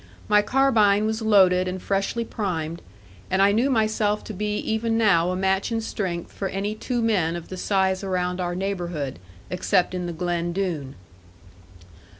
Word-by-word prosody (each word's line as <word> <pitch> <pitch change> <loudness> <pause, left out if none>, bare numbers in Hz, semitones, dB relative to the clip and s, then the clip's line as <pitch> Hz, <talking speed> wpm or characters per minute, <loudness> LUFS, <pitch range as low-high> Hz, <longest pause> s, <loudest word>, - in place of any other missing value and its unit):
My 210 -1 +5
carbine 215 -4 +3
was 220 +1 -1
loaded 185 -4 +4
and 185 +1 -3
freshly 200 +5 -1
primed, 170 -7 -3 0.5
and 190 - +1
I 200 +1 +5
knew 235 +6 +2
myself 215 -3 +1
to 220 - -7
be 210 +2 -2
even 225 +1 -1
now 185 -6 +3
a 185 - -1
match 190 +3 0
in 225 - 0
strength 190 -6 -4
for 195 - -4
any 195 +2 -2
two 240 +2 -2
men 180 -7 +1
of 170 -1 -7
the 185 - -5
size 190 0 +1
around 180 -1 -1
our 175 0 -2
neighbourhood, 175 - -3 0.3
except 180 0 +1
in 180 -1 -3
the 170 - -4
Glen 175 0 -2
Doone. 165 -8 -3
195 Hz, 165 wpm, -24 LUFS, 180-215 Hz, 0.5 s, My